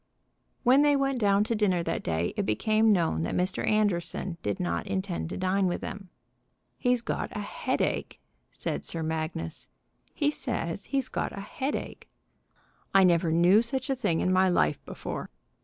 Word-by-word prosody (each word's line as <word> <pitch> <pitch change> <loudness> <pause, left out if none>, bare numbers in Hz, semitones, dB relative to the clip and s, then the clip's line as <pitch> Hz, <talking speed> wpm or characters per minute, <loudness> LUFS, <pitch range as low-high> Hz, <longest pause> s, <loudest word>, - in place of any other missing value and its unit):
When 260 +2 +6
they 290 -1 +4
went 275 -2 +1
down 200 -2 +4
to 230 - -1
dinner 195 -5 +1
that - - -2
day 85 +1 -1
it - - 0
became 215 - +2
known 165 - +2
that 85 - -2
Mr. 185 +1 0
Anderson 190 -4 0
did 100 -1 -2
not 85 -1 -2
intend 85 -4 -2
to - - -5
dine 185 +1 +1
with 175 - -2
them. 195 -2 -7 0.7
"He's 245 -2 +2
got - - -2
a - - -2
headache," - - -2 0.3
said - - -3
Sir 165 -1 -3
Magnus. 155 - -4 0.5
"He 290 0 +2
says 200 - -3
he's 270 -2 0
got - - -3
a - - -4
headache. 265 +7 -4 0.9
I 195 - +8
never 170 -2 +3
knew 175 +6 +5
such 265 +3 -3
a - - +2
thing 205 -10 0
in 185 - +2
my 185 0 +4
life 75 - +1
before." - - -5
190 Hz, 170 wpm, -28 LUFS, 165-230 Hz, 0.9 s, I